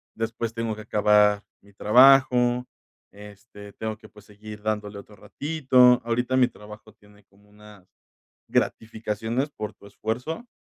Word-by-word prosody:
después 115 0 -4
tengo 115 -1 -3
que 110 - -10
acabar 105 -1 +3 0.2
mi 100 0 -21
trabajo, 125 +2 +4 0.5
este, 105 0 -14
tengo 110 -1 -5
que, 110 -1 -16
pues, 105 -1 -18
seguir 105 +1 -12
dándole 105 -1 -3
otro 105 +1 -15
ratito. 130 -3 +2
Ahorita 125 +2 -1
mi 125 -1 +4
trabajo 105 -1 -14
tiene 105 -1 -23
como 100 +1 -27
unas 105 -2 -17 0.6
gratificaciones 110 +4 -2
por 105 -6 -7
tu - - -18
esfuerzo 125 - -5
110 Hz, 135 wpm, -24 LUFS, 105-120 Hz, 0.6 s, trabajo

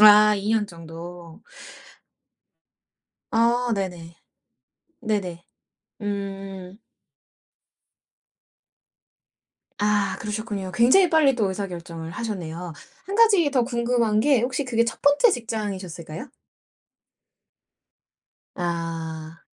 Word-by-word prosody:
아 210 0 +9
2 200 +2 -3
년 220 -2 +2
정도. 170 -1 -10 1.9
아 235 +1 +2
네네. 175 -4 -5 0.8
네네. 200 -7 -2 0.6
음. 195 -2 -5 3.0
아 205 -1 +1
그러셨군요. 210 -3 -4
굉장히 260 - +5
빨리 300 -5 +5
또 215 -5 +1
의사결정을 170 -4 -5
하셨네요. 175 -5 -5 0.3
1 395 - -5
가지 405 -9 +5
더 260 -3 +2
궁금한 235 -3 +1
게 270 0 +4
혹시 255 +4 -1
그게 235 -2 +2
1 230 - -4
번째 290 +12 +5
직장이셨을까요? 190 - -4 2.3
아. 165 -2 -4
205 Hz, 160 characters per minute, -24 LUFS, 175-235 Hz, 3.0 s, 아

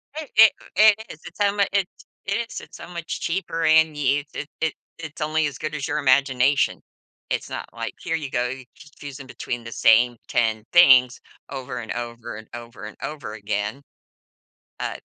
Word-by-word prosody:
I 310 -1 -5
i 225 0 +11 0.3
it 215 -1 +8
is, 155 - -10
it's 175 - -11
so 205 0 +2
much 200 -1 +2
it's 195 -2 -2 0.2
it 195 - -1 0.2
is. 230 - -6
It's - - -13
so - - -10
much 170 -2 -5
cheaper, 165 -1 -2
and 160 0 +5
you 145 0 +1
it 145 - -5
it 160 -2 +1 0.3
it's 160 0 -8
only 155 +1 +1
as 145 - -6
good 155 -1 -4
as 145 -1 -3
your 150 - -1
imagination. 135 0 +3 0.5
It's - - -2
not - - -5
like, 115 0 -5
"Here 165 - -1
you 150 -4 -4
go, 125 -1 0
you're 130 0 -7
just 145 0 -17
choosing 140 -1 -8
between 120 -2 -5
the 115 - -8
same 115 +2 +4
10 110 -2 +1
things 130 -7 +7 0.3
over 130 -3 -5
and 115 -2 -6
over 120 -1 -6
and 110 0 -10
over 120 -2 -9
and 105 - -9
over 145 -8 -5
again," 105 +4 -3 1.0
but, - - -4
140 Hz, 190 wpm, -23 LUFS, 120-160 Hz, 1.0 s, i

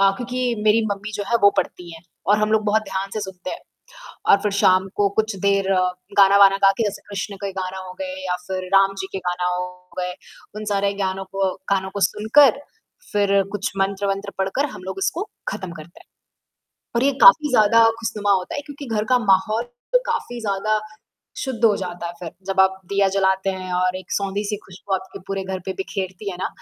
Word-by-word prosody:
अ, 195 0 +6
क्योंकि 250 0 -2
मेरी 220 +1 +4
मम्मी 210 +2 -4
जो 205 - -3
है 235 - +4
वो 200 - +8
पढ़ती 175 -1 -2
हैं 165 - -13 0.3
और 210 - +4
हम 215 0 +1
लोग 215 -1 +2
बहुत 215 +1 +2
ध्यान 195 -1 -4
से 215 - -2
सुनते 185 -2 -6
हैं। - - -6 0.7
और 200 - +8
फिर 210 -1 0
शाम 185 +1 +4
को 205 -1 +3
कुछ 220 -2 0
देर 195 -1 +2 0.5
गाना-वाना 195 0 +7
गा 195 - +7
के 230 - +1
जैसे 205 -1 -3
कृष्ण 200 0 -4
के 195 - -2
गाना 185 0 -4
हो 185 - -8
गए 280 0 -4
या 180 - 0
फिर 185 -1 -3
राम 195 0 +5
जी 190 - -5
के 195 - -3
गाना 180 0 0
हो 180 0 -2 0.3
गए 180 0 -2 0.4
उन 215 0 -5
सारे 200 0 +1
ग्यानों 195 -1 -2
को 195 -1 0 0.2
गानों 190 -1 +1
को 200 - -4
सुनकर, 255 +9 +4 0.5
फिर 200 -1 +3
कुछ 205 -1 -2
मंत्र-वंत्र 195 +1 -1
पढ़कर 195 +10 0
हम - - -10
लोग 190 +1 -5
इसको 385 +6 -2 0.2
खत्म 190 - -5
करते 155 +3 -13
हैं। - - -20 0.9
और 235 - +2
ये 280 - +4
काफ़ी 320 -12 +8
ज़्यादा 230 -1 +5 0.2
ख़ुशनुमा 215 -3 -1
होता 185 -2 -1
है 285 - -2
क्योंकि 285 -1 -9
घर 210 - +1
का 250 - +6
माहौल 215 +2 +2 0.3
तो - - +6
काफ़ी 240 -1 -3
ज़्यादा 215 +1 0 0.6
शुद्ध 255 -4 -2
हो 210 -3 +5
जाता 175 -2 -5
है 170 - -5
फिर, 170 - -6 0.2
जब 190 0 +1
आप 190 0 +3
दिया 200 0 +2
जलाते 190 0 +1
हैं 185 -1 -5
और 185 +1 +1
एक 185 - -9
सौंधी-सी 200 +1 -1
खुशबू 190 +1 -5
आपके 190 0 -5
पूरे 195 -1 -3
घर 190 0 -4
पे 190 - -1
बिखेरती 195 0 -4
है 180 - -6
ना, - - -1
195 Hz, 205 wpm, -22 LUFS, 190-215 Hz, 0.9 s, वो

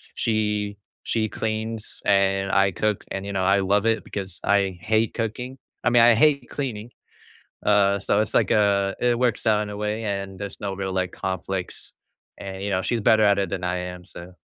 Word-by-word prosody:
she 105 -2 -1 0.3
she 110 -1 0
cleans 110 0 -4
and 95 0 +2
I 95 0 +3
cook 105 +3 -1
and, 95 0 -4
you 100 - -4
know, 95 -1 0
I 95 +2 +4
love 100 +2 +2
it 115 0 +1
because 95 -3 -6
I 100 -2 +2
hate 110 0 +1
cooking 125 +3 -4 0.3
I - - +5
mean, 120 -1 +5
I 120 0 +7
hate 140 0 +3
cleaning, 120 -5 -5 0.8
uh, 100 -1 +4
so 100 +1 +1
it's 110 - -2
like, - - +3
uh, 100 -2 +2
it 120 -1 +2
works 125 -1 0
out 105 -1 +3
in 105 - -5
a 105 - -6
way 105 +2 -2
and 100 -2 -4
there's 100 -1 -7
no 100 -1 -3
real, 95 0 -4
like, 95 -1 -1
conflicts, 95 0 -4 0.5
and, 95 -1 -7
you 100 - -2
know, 95 -1 0
she's 115 +5 -1
better 110 +1 +4
at 100 -1 +4
it 100 - -1
than 95 -2 -3
I 90 0 -1
am, 90 0 -6
so 90 0 -11
100 Hz, 205 wpm, -24 LUFS, 95-110 Hz, 0.8 s, I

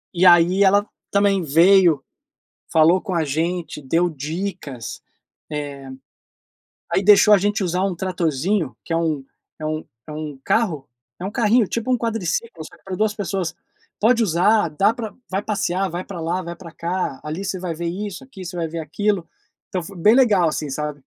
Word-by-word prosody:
e 180 - +3
aí 175 +3 +6
ela 200 +2 +4 0.2
também 200 -1 +3
veio, 165 -1 +5 0.7
falou 165 +3 +5
com 190 -3 -4
a 165 -2 +1
gente, 160 +1 -2
deu 165 +6 +1
dicas, 155 - -5 0.5
eh, 145 -2 -5 1.1
aí 195 - +2
deixou 210 +1 +7
a 205 - +8
gente 205 +2 0
usar 180 +1 0
um 195 -2 0
tratorzinho, 175 -2 -1
que 165 - -4
é - - +2
um 155 -5 -1 0.3
é 155 - -5
um 155 0 -3 0.2
é - - -8
um 150 -2 -6
carro 170 - 0 0.3
é 180 - -7
um 200 - -3
carrinho, 230 0 +3
tipo 230 +2 -3
um 250 - +3
quadriciclo, 225 -4 -2
só - - -14
que - - -33
para 190 -1 -5
2 215 +1 +1
pessoas. 195 -5 -3 0.4
"Pode 235 +2 +4
usar, 195 +2 +3
dá 195 +9 +2
para 225 -3 -6 0.2
vai 195 +1 -1
passear, 195 -3 -1
vai 175 +2 -4
para 185 -3 -8
lá, 175 +3 -1
vai 170 -1 -6
para 170 -4 -11
cá. 170 -5 -3
Ali 160 +6 -4
você 190 0 -2
vai 175 -2 -3
ver 170 +1 -4
isso, 195 +3 -4
aqui 225 -8 -11
você 170 - -7
vai 165 - -1
ver 165 +1 -5
aquilo", 175 +4 -1 0.4
então 185 - -2
foi 195 +3 -10
bem 210 +6 +5
legal, 205 -11 +4
assim, 150 -1 -3
sabe. 150 0 -4
180 Hz, 185 wpm, -21 LUFS, 160-200 Hz, 1.1 s, a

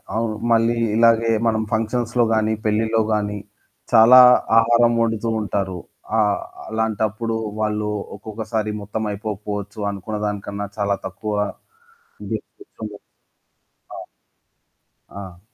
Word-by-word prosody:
అవును. 110 -1 -1 0.2
మళ్ళీ 115 +1 +3 0.2
ఇలాగే 115 0 +4 0.2
మనం 110 -1 +1
ఫంక్షన్స్‌లో 120 +2 0
గాని, 110 0 +1
పెళ్లిలో 110 +1 +1
గాని 105 -1 -1 0.5
చాలా 120 +2 +8 0.4
ఆహారం 120 +1 +4
వండుతూ 115 0 0
ఉంటారు. 100 -3 -2 0.4
ఆహ్, 105 -3 +2 0.3
అలాంటప్పుడు 110 0 -1 0.2
వాళ్ళు 105 0 -1 0.3
ఒక్కొక్కసారి 110 +1 -4
మొత్తం 105 +2 -4
అయిపోకపోవచ్చు 105 0 -5
అనుకున్న 100 +2 -5
దానికన్నా 100 0 -4
చాలా 100 -1 +1
తక్కువ 105 +3 -5 0.9
ది - - 0 0.2
తెచ్చుండొచ్చు 110 - -11 0.9
ఆ! - - -7 1.1
ఆ! 95 -3 -10
110 Hz, 100 wpm, -21 LUFS, 105-115 Hz, 1.1 s, చాలా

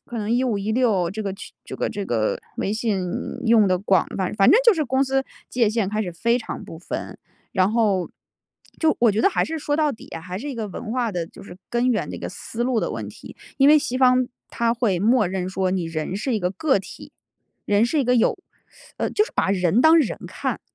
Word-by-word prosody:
可 240 - -7
能 215 0 -3
15-16 220 -5 +1
这 215 +2 -4
个 195 -1 -3
去 - - -11
这 - - -7
个 - - -1
这 205 -2 -4
个 110 -2 0 0.2
微 200 - -1
信 215 -5 -1 0.4
用 220 -3 +5
得 185 -1 +2
广， 195 0 +2
反 185 -2 -1
反 195 -1 +5
正 425 - +7
就 465 - +8
是 310 -6 -1
公 265 +2 +2
司 270 0 +1 0.3
界 235 -4 +2
限 215 -3 -1
开 215 - -1
始 180 - -4
非 235 +8 +1
常 235 - -7
不 160 - -10
分， 180 - -6 0.3
然 190 0 +2
后， 210 -6 +1 0.7
就 320 -1 +3
我 235 -3 +5
觉 215 - 0
得 - - +5
还 - - +1
是 320 0 -4
说 290 0 -1
到 300 -2 +2
底 225 - -12
啊， 165 - -7
还 185 +1 -6
是 285 +7 -6
一 270 - -4
个 220 -2 -3
文 220 +3 -7
化 240 -4 -1
的 175 -2 -2
就 - - -14
是 185 -2 -12
根 240 +1 +1
源 225 - -1
的 - - -6
一 - - -8
个 - - -5
思 235 +1 -5
路 245 -3 +1
的 - - -2
问 - - -5
题。 - - -13 0.2
因 275 +1 +6
为 305 - +8
西 255 -2 -2
方 255 -1 +4 0.2
它 235 0 0
会 225 -7 0
默 225 +1 +3
认 185 0 -3
说 190 0 -1
你 180 -3 -1
人 165 +2 -4
是 240 +3 -1
一 - - 0
个 180 -1 -1
个 265 - +2
体， 190 - -11 0.5
人 205 +2 +3
是 295 +6 0
一 275 - +2
个 250 +1 +3
有， 245 - +2 0.6
呃， - - -1
就 425 - +2
是 - - -12
把 - - +1
人 185 +3 +2
当 320 +2 +7
人 280 - +1
看， - - -3
220 Hz, 255 characters per minute, -23 LUFS, 190-255 Hz, 0.7 s, 就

